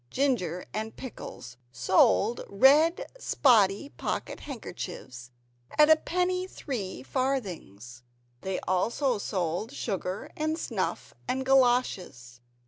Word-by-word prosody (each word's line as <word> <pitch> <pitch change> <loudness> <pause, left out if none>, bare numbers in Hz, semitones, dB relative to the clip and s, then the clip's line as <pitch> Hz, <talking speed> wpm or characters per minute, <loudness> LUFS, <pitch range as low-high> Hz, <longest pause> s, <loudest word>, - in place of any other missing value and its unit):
Ginger 185 - 0
and 220 +1 -4
Pickles 125 - -9
sold 185 - +3
red 300 - +5
spotty 230 - +3
pocket - - -4
handkerchiefs 150 - -7 0.5
at 300 +1 +7
a - - +10
penny 360 +3 -1
three 215 - -5
farthings. 155 - -3 0.4
They 190 -1 -2
also 230 +6 0
sold 185 +2 -2
sugar, 195 -7 -4
and 310 +1 -1
snuff - - -3
and 260 +1 -1
galoshes. 240 - +1
220 Hz, 100 wpm, -28 LUFS, 180-275 Hz, 0.5 s, a